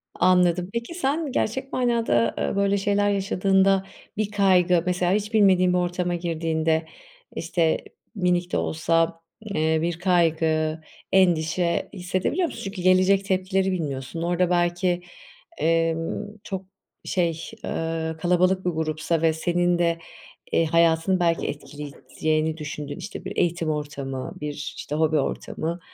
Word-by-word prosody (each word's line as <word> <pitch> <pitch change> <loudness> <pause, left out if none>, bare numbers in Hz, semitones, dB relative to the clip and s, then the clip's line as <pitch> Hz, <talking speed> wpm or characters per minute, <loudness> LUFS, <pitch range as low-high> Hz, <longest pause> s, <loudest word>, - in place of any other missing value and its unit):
Anladım. 180 -1 +3
Peki, 235 +7 -4
sen 300 -2 -1
gerçek 265 +5 -2
manada, 230 - +2
eee, - - -1
böyle 200 0 +2
şeyler 205 +1 +1
yaşadığında, 195 0 +2 0.3
bir 210 -1 -1
kaygı, 180 -4 +3
mesela, 180 0 +1
hiç 210 +2 -1
bilmediğin 185 -4 +4
bir - - +3
ortama 180 0 -1
girdiğinde, 160 -1 0 0.5
işte, 165 -1 +1 0.4
minik 180 -1 0
de - - +1
olsa, 165 +1 0 0.3
eee, 160 0 +2
bir 170 0 -2
kaygı, 160 -3 +2 0.3
endişe 175 -2 +2
hissedebiliyor 185 - -1
musun? - - -8
Çünkü 195 -2 -5
gelecek 185 +2 +4
tepkileri 190 0 +1
bilmiyorsun. 150 -2 -4
Orada 175 +1 +1
belki, 175 0 +1 0.6
emm, 165 +2 0 0.2
çok, 190 -1 -5 0.4
şey, 175 -2 +1 0.3
eee, 160 0 -2
kalabalık 185 +2 +2
bir 180 - +2
grupsa 160 0 -1
ve 165 -1 +4
senin 175 +2 +1
de, 170 -1 +1 0.5
eee, 165 - +3
hayatını 165 +3 +3
belki 170 -1 +1
etkileyeceğini 155 +2 -3
düşündüğün, 150 -2 -6
işte, 210 - -7
bir - - -6
eğitim 170 -2 +1
ortamı, 140 -3 -4
bir, 150 0 -3 0.2
işte, 145 - -5
hobi 155 0 +2
ortamı, 165 +4 -3
175 Hz, 130 wpm, -24 LUFS, 160-190 Hz, 0.6 s, bilmediğin